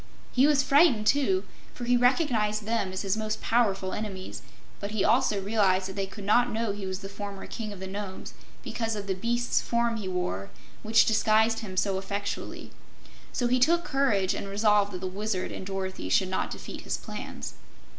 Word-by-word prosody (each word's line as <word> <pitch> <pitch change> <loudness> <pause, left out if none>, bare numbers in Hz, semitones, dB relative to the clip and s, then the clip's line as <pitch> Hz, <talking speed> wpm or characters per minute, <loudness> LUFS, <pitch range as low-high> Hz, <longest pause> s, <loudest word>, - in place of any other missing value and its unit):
He 260 +3 +5
was 290 -2 +4
frightened, 275 -6 +5
too, 285 - +3 0.3
for 245 - -6
he 245 +1 +3
recognized 240 -5 +2
them 220 -4 0
as 190 +1 -3
his 195 0 +1
most 215 0 -2
powerful 195 -5 +1
enemies; 195 -3 -5 0.4
but 200 - -4
he 210 -2 0
also 225 -2 +3
realized 195 -2 +2
that 190 - -7
they 195 -1 -2
could 200 +1 -9
not 240 +5 +3
know 225 -1 -1
he 200 -1 -5
was 190 +1 -4
the 195 - -6
former 200 0 -7
King 215 -2 -5
of 200 - -8
the 190 - -5
Nomes, 195 0 -6 0.3
because 225 -2 -2
of 205 -1 -4
the 195 - 0
beast's 240 +5 0
form 235 -1 0
he 205 -3 -4
wore, 140 - -2 0.3
which 220 +1 +5
disguised 220 +1 +3
him 190 -4 -7
so 195 0 +1
effectually. 200 +1 -4 0.6
So 245 - -1
he 250 +1 +3
took 335 +7 +4
courage 220 - +2
and - - -4
resolved 205 0 +3
that 180 - -5
the - - -3
Wizard 190 0 -2
and 190 - -6
Dorothy 190 - -4
should 185 - +3
not 185 - -1
defeat - - -7
his - - -2
plans. - - -7
210 Hz, 195 wpm, -28 LUFS, 195-230 Hz, 0.6 s, He